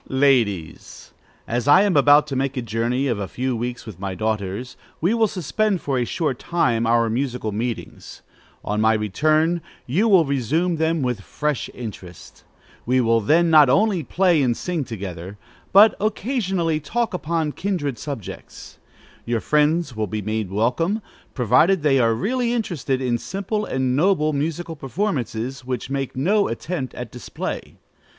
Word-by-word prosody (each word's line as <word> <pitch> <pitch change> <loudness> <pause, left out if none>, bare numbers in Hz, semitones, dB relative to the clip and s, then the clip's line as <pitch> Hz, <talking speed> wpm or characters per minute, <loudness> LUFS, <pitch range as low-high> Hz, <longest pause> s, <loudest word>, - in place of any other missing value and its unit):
_ - - -35
Ladies, 120 - 0 0.4
As 120 +3 -2
I 145 +7 +7
am 200 -3 +1
about 145 +1 +6
to 145 -3 -5
make 135 +1 -1
a 125 - -1
journey 115 +4 -1
of 120 -6 -1
a 100 - -3
few 130 +4 -2
weeks 120 +2 -4
with 105 -6 -10
my 95 -1 -4
daughters, 110 +3 -3 0.2
we 180 +7 +2
will 225 -1 +3
suspend 200 +2 -1
for 135 -5 -1
a 120 - 0
short 145 -3 -2
time 120 -10 0
our 115 0 +3
musical 120 -1 -2
meetings. 115 +2 -5 0.4
On 105 +1 -1
my 110 0 +4
return, 155 - +1 0.2
you 180 - +1
will 190 -6 +5
resume 150 +6 0
them 160 -1 0
with 125 -5 -1
fresh 150 +6 -3
interest. 95 -7 -10 0.4
We 130 +2 +2
will 115 -2 +3
then 165 +9 +3
not 150 -4 +7
only 200 - +3
play 175 +1 +2
and 120 -3 +1
sing 175 -4 -2
together, 95 -3 -7 0.3
but 210 +3 +7
occasionally 195 - 0
talk 225 +9 -2
upon 165 -3 -1
kindred 155 -8 -3
subjects. 140 - -8 0.4
Your 120 -1 -1
friends 150 +1 +1
will 110 -1 -2
be 105 +2 -4
made 110 -1 -2
welcome, 125 - 0 0.3
provided 150 - +3
they 135 -3 +4
are 115 -2 +3
really 240 - 0
interested 150 - -2
in 120 -2 0
simple 200 - -3
and 130 -4 -1
noble 155 -1 +2
musical 160 +3 -3
performances, 135 - -3
which 125 0 -4
make 135 -1 -3
no 200 +10 +2
attempt 135 +3 -4
at 120 -2 -7
display. 125 - -6
135 Hz, 160 wpm, -22 LUFS, 115-170 Hz, 0.4 s, I